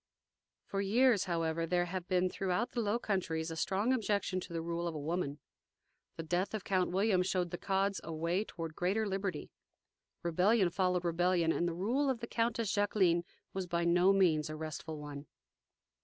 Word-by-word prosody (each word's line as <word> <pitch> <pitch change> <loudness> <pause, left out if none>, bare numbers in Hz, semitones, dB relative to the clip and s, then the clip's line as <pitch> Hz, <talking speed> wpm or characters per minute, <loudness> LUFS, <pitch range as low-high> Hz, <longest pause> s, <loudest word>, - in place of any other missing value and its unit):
For 195 - -2
years, 220 +1 +3
however, 165 -2 -1
there 175 +1 +2
had 180 0 -5
been 185 -1 +2
throughout 195 +4 -1
the 240 - -1
Low 210 +1 +1
Countries 170 -7 -2
a - - -4
strong 200 +9 +1
objection 205 -5 0
to 180 - -9
the 165 -1 -3
rule 170 +1 -2
of 165 - -4
a - - -3
woman. 150 -1 -2 0.8
The 165 - -5
death 180 +6 -1
of 210 - -4
Count 185 -2 +1
William 190 +1 +2
showed 180 -2 0
the 175 - -4
Cods 195 0 0
a 165 - -6
way 170 +5 0
toward 165 -6 -7
greater 200 +5 0
liberty. 195 -5 -3 0.7
Rebellion 180 +3 +3
followed 180 -1 +1
rebellion, 175 0 +2
and 175 - 0
the 170 - -2
rule 245 +10 +1
of 255 -3 0
the 235 - -4
Countess 230 -2 0
Jacqueline 190 -4 +2 0.3
was 190 -1 -3
by 170 0 0
no 175 +2 +5
means 165 -6 +3
a 155 - -4
restful 155 0 -5
one. 145 -1 -8
180 Hz, 185 wpm, -33 LUFS, 170-200 Hz, 0.8 s, no